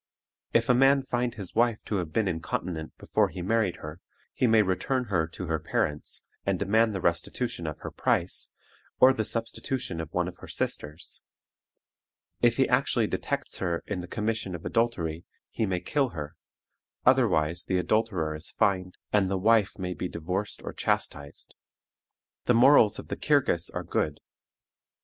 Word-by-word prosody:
If 115 0 +3
a 125 - +5
man 135 +2 +5
find 120 -2 -1
his 95 -4 -8
wife 115 -1 +3
to 105 - -1
have 85 -4 -3
been 105 +5 +1
incontinent 80 -1 -3
before - - +1
he 90 - -6
married 105 -2 +1
her, 80 +2 -9 0.3
he 125 - +2
may 110 -1 +5
return 115 +7 0
her 80 -3 +2
to 90 +3 -7
her 80 -2 -1
parents, 75 -1 -2 0.2
and 100 -1 0
demand 110 +3 +2
the - - -1
restitution 85 +2 -1
of 75 0 -4
her - - -6
price, - - +1 0.5
or 130 +1 +8
the 110 - -1
substitution 115 -3 -3
of 80 - -8
one 90 0 0
of 90 0 -8
her - - -11
sisters. 75 +4 -4 1.2
If - - +4
he - - +4
actually - - +2
detects - - -3
her 85 -2 -1
in 100 -3 -3
the 90 - -8
commission 105 -3 -2
of 85 - -9
adultery, 85 -9 0 0.3
he 110 - -1
may 90 -2 -1
kill 135 +8 +1
her, 75 -4 -7 0.7
otherwise 90 -11 +3
the 95 - 0
adulterer 90 -4 0
is 75 +3 -7
fined, 95 -2 0 0.2
and 100 -2 +4
the 95 0 0
wife 105 +1 +3
may 90 -2 -3
be 90 +2 -3
divorced 90 +5 -3
or - - -5
chastised. 70 -1 -2 0.9
The 125 - +4
morals 115 -4 +6
of - - -9
the - - -2
Kirghiz 135 - +2
are - - -4
good. - - -1
95 Hz, 170 wpm, -28 LUFS, 85-115 Hz, 1.2 s, or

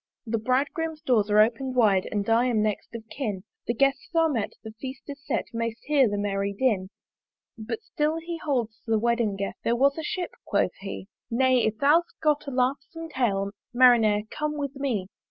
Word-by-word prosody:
"The 230 0 -1
Bridegroom's 295 +6 -1
doors 225 -8 +2
are 210 - +3
open'd 240 +4 +2
wide 205 -6 +3
"And 205 -1 -1
I 230 +2 +3
am 225 -4 +2
next 215 +2 -3
of 225 -1 -8
kin; 210 -9 -3 0.2
"The 235 - 0
Guests 275 +2 +1
are 325 -1 +4
met, 230 -8 -2
the 220 - -7
Feast 265 -1 -6
is 280 0 -7
set, - - -1
"May'st 230 0 -3
hear 280 -5 +3
the 205 - -2
merry 200 0 -1
din. 200 -4 +1 0.7
But 235 - -5
still 305 -4 -1
he 335 +1 -5
holds 235 -7 -1
the 225 -1 +3
wedding 235 -2 +1
guest 195 0 -4
There 235 - +2
was 280 +5 +3
a - - -4
Ship, 355 +3 -3
quoth - - +1
he 195 -1 -7 0.2
"Nay, 255 +1 +3
if 220 - -1
thou'st 310 +7 +2
got 300 -1 +1
a - - -1
laughsome 275 +6 -1
tale, 200 -8 0 0.2
"Marinere! 225 -4 +5
come 300 0 -2
with 280 -1 -3
me." 250 -9 -2
245 Hz, 190 wpm, -26 LUFS, 215-280 Hz, 0.7 s, Marinere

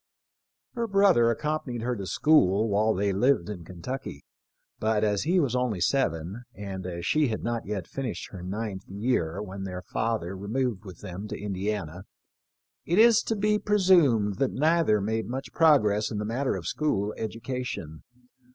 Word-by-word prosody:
Her 235 -2 -2
brother 195 - +4
accompanied 125 -2 -2
her 125 +1 -1
to 100 -4 -6
school 110 -9 +3
while 110 +2 +2
they 100 +1 0
lived 115 -2 +2
in 95 -5 -6
Kentucky, 125 +11 -7 0.6
but 110 -1 +1
as 105 +1 +1
he 180 +3 +3
was 135 -7 +1
only 125 -6 0
seven, 90 - 0
and 95 -2 -6
as 85 -1 -5
she 150 - +3
had 110 -3 -3
not 115 -2 -2
yet 100 -4 -3
finished 135 -4 -5
her 95 - -8
ninth 100 +1 -5
year 100 -5 -1
when 95 -1 -7
their 90 -1 -5
father 110 -5 -2
removed 110 +1 -2
with 90 -4 -11
them 100 +1 -7
to - - -6
Indiana, 95 -3 -3 0.8
it 175 - 0
is 230 0 +7
to 225 - -2
be 210 +1 +2
presumed 170 - +3
that 135 - +2
neither 155 -8 +3
made 110 +2 -1
much 130 +3 -5
progress 105 -10 +4
in 110 - -4
the 105 - -2
matter 130 +5 -1
of - - -6
school 105 -9 -1
education. 115 - -5
110 Hz, 165 wpm, -27 LUFS, 95-135 Hz, 0.8 s, is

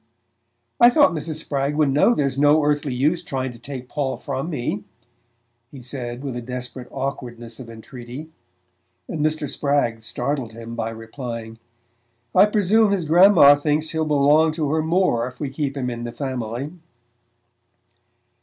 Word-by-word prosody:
"I 240 - +9
thought 290 +3 +5
Mrs. 155 0 -3
Spragg 145 -2 -2
would 150 -2 +2
know 150 - +4
there's 140 -2 -1
no 145 +1 +5
earthly 145 -1 0
use 145 +7 +1
trying 130 -1 -3
to 120 - -14
take 130 0 -7
Paul 140 -2 -2
from 140 +3 -4
me," 120 -8 -3 0.9
he 135 -2 -11
said 125 0 -6
with 135 -3 -4
a 120 - -4
desperate 125 +1 -6
awkwardness 120 -4 -6
of 125 -3 -9
entreaty, 120 +6 -9 0.8
and 150 - -3
Mr. 155 -1 0
Spragg 140 -6 0
startled 120 +1 -3
him 115 +1 -8
by 115 -1 -2
replying: 115 0 -7 0.7
"I 195 +3 +7
presume 210 +1 +3
his 190 -5 0
grandma 170 -2 +7
thinks 150 +2 0
he'll 160 -1 -1
belong 150 +2 +4
to 155 -3 -1
her 160 0 +1
more 160 -8 +1
if 125 0 -11
we 145 -3 -3
keep 140 0 -3
him 125 -2 -2
in 120 0 -5
the 120 - -4
family." 130 0 -4
140 Hz, 155 wpm, -22 LUFS, 120-155 Hz, 0.9 s, I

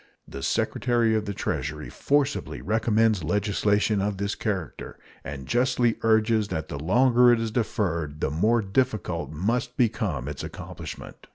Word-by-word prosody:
The 70 - -8
Secretary 120 - +1
of 110 -1 0
the 100 - -3
Treasury - - -3
forcibly 145 0 0
recommends 110 -2 +1
legislation 105 +3 +1
of 100 0 -1
this 100 +1 -2
character, 95 -7 -4 0.3
and 70 -2 -7
justly 120 -1 +2
urges 110 -1 +3
that 80 -4 -4
the 75 -4 -5
longer 120 - +4
it 120 - +3
is 115 -1 -2
deferred 85 -10 -2
the - - -1
more 110 +9 +2
difficult 95 -5 -1
must 115 +10 -2
become 105 - 0
its 75 -1 -5
accomplishment. - - -9
105 Hz, 145 wpm, -26 LUFS, 90-115 Hz, 0.3 s, longer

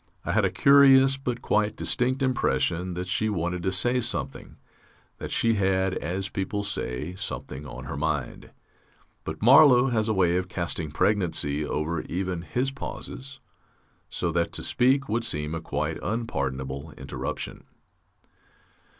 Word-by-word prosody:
I - - -1
had - - +2
a - - +2
curious 135 -1 +6
but 125 -3 -4
quite 105 0 +1
distinct 130 +2 0
impression 90 -8 0
that 90 +1 -3
she 110 +4 0
wanted 90 -2 -2
to 95 - 0
say 120 +6 +2
something, 75 - -4 0.6
that - - -5
she 115 0 +2
had, 95 -2 +1
as 95 +5 -3
people 100 +2 -3
say, 80 -5 -3
something 75 -7 -6
on - - -8
her - - -6
mind. 75 -3 -3 0.8
But 80 +4 -6
Marlow 130 +1 +7
has 110 -2 0
a - - +2
way 90 -2 +3
of 90 0 -3
casting 85 -3 -3
pregnancy 80 -5 0
over 75 +2 -2
even 90 -1 -3
his 125 +9 -2
pauses, 135 0 -8 0.7
so 85 - -2
that 85 +1 0
to - - -1
speak 135 +2 +2
would 115 +2 -1
seem 75 -7 -2
a 80 - -3
quite 75 +1 -3
unpardonable 70 - -3
interruption. 65 0 -6
95 Hz, 145 wpm, -26 LUFS, 80-120 Hz, 0.8 s, Marlow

